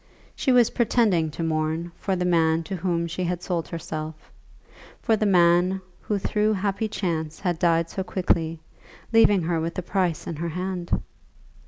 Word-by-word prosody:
She 265 - +1
was 245 -2 +5
pretending 215 -9 +2
to 155 +3 -5
mourn 160 +1 -1
for 195 - -2
the 180 0 -1
man 165 -2 +2
to 190 +4 -5
whom 170 -1 -1
she 170 +2 -3
had 180 0 -2
sold 170 -3 -2
herself; 155 -2 -6 0.7
for 225 - +2
the 215 0 +1
man 180 0 +4 0.2
who 210 - -2
through 210 +2 +1
happy 200 +2 -1
chance 160 -6 -3
had 175 -4 -1
died 170 -2 +3
so 190 - -4
quickly, 165 -4 0 0.5
leaving 205 -5 +5
her 165 0 0
with 165 +1 -3
the 185 - -3
price 180 -3 -1
in 165 - -5
her 170 +2 -3
hand! 180 +1 -4
175 Hz, 170 wpm, -25 LUFS, 165-190 Hz, 0.7 s, was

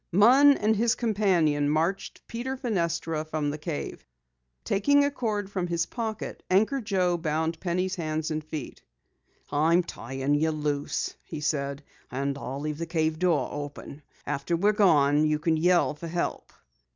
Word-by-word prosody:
Munn 260 +9 +6
and 215 +1 +2
his 230 +2 +2
companion 180 -10 +2
marched 165 +6 -1
Peter 260 +3 -4
Fenestra 170 - -1
from 155 -2 -2
the 150 - -5
cave. 150 0 -5 0.6
Taking 285 +8 +3
a 285 - 0
cord 215 -7 -2
from 185 -3 -2
his 170 -1 0
pocket, 220 -3 -5
Anchor 220 +9 +2
Joe 185 -5 +1
bound 160 0 -1
Penny's 185 +1 -1
hands 155 -3 -2
and 155 0 -2
feet. 155 -3 -7 0.7
"I'm 165 +4 +3
tying 135 -4 -7 0.2
'em 155 -1 0
loose," 145 -1 -1
he 155 - -7
said. 140 -2 -2 0.3
"And 140 +2 -2
I'll 140 0 -5
leave 150 0 -4
the 170 - -3
cave 160 -1 0
door 165 -8 +2
open. 145 0 -7 0.2
After 140 +5 -1
we're 205 +5 +3
gone 150 -8 +4
you 150 0 +1
can 160 +1 +1
yell 175 +1 +3
for 160 +3 -8
help." 170 +1 -3
165 Hz, 155 wpm, -27 LUFS, 150-200 Hz, 0.7 s, Munn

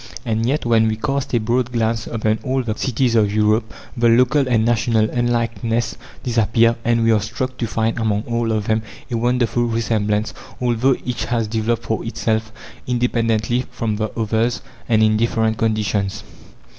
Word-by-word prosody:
And 115 0 0
yet, 140 +1 0
when 115 -2 +4
we 110 - 0
cast 140 +4 -2
a - - +3
broad 120 +3 0
glance 115 -1 -1
upon 110 -1 0
all 130 -1 -1
the 110 -3 -2
cities 125 0 0
of 105 -3 +3
Europe, 110 +1 +1 0.2
the 120 -1 +3
local 130 +4 +3
and 115 -3 +2
national 115 -2 +2
unlikenesses 115 -1 -1 0.3
disappear, 115 -1 +2
and 115 0 +2
we 115 - +4
are 110 -2 +3
struck 120 +4 -4
to 115 - -1
find 115 +1 -1
among 105 -2 0
all 115 -1 -1
of 105 -2 -1
them 110 +1 +1 0.3
a 120 - 0
wonderful 120 0 +1
resemblance, 110 -2 0 0.3
although 125 +2 +2
each 125 -1 -2
has 115 -2 -1
developed 115 +1 -1
for 110 - -2
itself, 110 -1 -1 0.4
independently 120 -1 0
from 110 -2 -2
the 110 0 -1
others, 115 +2 0 0.3
and 110 -2 +4
in 110 0 +3
different 110 -1 0
conditions. 105 -3 -1
115 Hz, 170 wpm, -20 LUFS, 110-120 Hz, 0.4 s, when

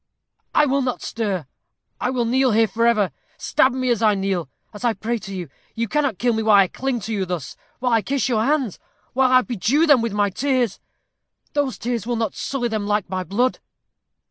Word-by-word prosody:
"I 300 - +6
will 275 0 +1
not 255 -2 -2
stir. 200 -8 -2 0.5
I - - 0
will 250 -2 0
kneel 255 +1 +2
here 225 +1 +4
forever. 225 -5 +2 0.3
Stab 260 - +2
me 255 0 -1
as 230 -2 0
I 215 -2 +4
kneel 190 -6 -2 0.2
as 210 - -10
I 240 -2 +2
pray 225 +3 -3
to 195 - -9
you. 180 -3 -5 0.3
You 230 0 -1
cannot 280 -4 0
kill 240 -1 +1
me 220 - 0
while 215 -1 +5
I 195 -1 +6
cling 265 -2 -2
to 220 +3 -4
you 200 -2 0
thus 175 -5 -4 0.2
while 250 -1 0
I 225 - +4
kiss 270 +7 -1
your 225 -4 +1
hands 270 - 0 0.3
while 260 0 +3
I 255 0 +6
bedew 250 - +1
them 290 -6 +5
with 230 -2 -2
my 205 -1 +1
tears. 255 -2 0 0.7
Those 285 -3 0
tears 235 -2 -3
will 240 - 0
not 225 -3 -1
sully 265 -3 -2
them 215 -3 -2
like 205 -3 0
my 185 -1 -1
blood." 235 +9 0
230 Hz, 210 wpm, -22 LUFS, 205-255 Hz, 0.7 s, I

